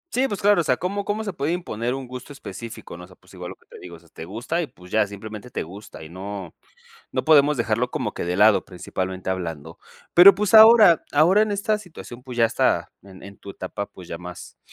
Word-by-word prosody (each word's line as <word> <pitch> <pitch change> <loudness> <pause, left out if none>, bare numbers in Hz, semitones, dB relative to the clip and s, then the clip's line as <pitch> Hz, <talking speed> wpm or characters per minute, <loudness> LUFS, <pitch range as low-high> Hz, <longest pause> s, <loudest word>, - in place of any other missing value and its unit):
Sí, 265 +2 +2
pues 205 -5 -5
claro. 205 -4 +4
O - - -3
sea, 125 -3 +1
¿cómo 200 +3 -3
cómo 215 +2 -2
se 200 -3 -5
puede 150 +3 -2
imponer 125 -8 -3
un 135 -1 -6
gusto 125 +3 -9
específico, 115 -8 -9
no?, 90 - -10
o - - -19
sea, 90 - -18
pues, - - -22
igual - - -8
lo - - -9
que - - -31
te - - -14
digo, 85 -1 -11
o - - -15
sea, 85 -2 -24
te 80 - -10
gusta 120 - -3
y, 155 - -4
pues 90 0 -17
ya, 110 -1 +2
simplemente 105 +3 -9
te - - -4
gusta, 95 -1 -12
y 80 - -11
no, 95 -1 -8 0.6
no - - -2
podemos 150 -2 +5
dejarlo 115 +1 -1
como - - -3
que - - -5
de 90 +1 -2
lado 105 +1 +5
principalmente 95 0 -5
hablando. 80 -4 -5 0.3
Pero, 185 +3 +9
pues, 210 0 -2
ahora 220 -5 +8
ahora 170 +8 +4
en 215 -1 +1
esta 205 +1 0
situación, 155 - -12
pues, 125 -2 -9
ya 115 - +4
está - - 0
en 95 -1 -15
en 100 0 -12
tu - - -14
etapa, 100 +2 -6
pues, 90 -2 -14
ya 85 - -7
más, 90 0 -11
115 Hz, 245 wpm, -23 LUFS, -, 0.6 s, Pero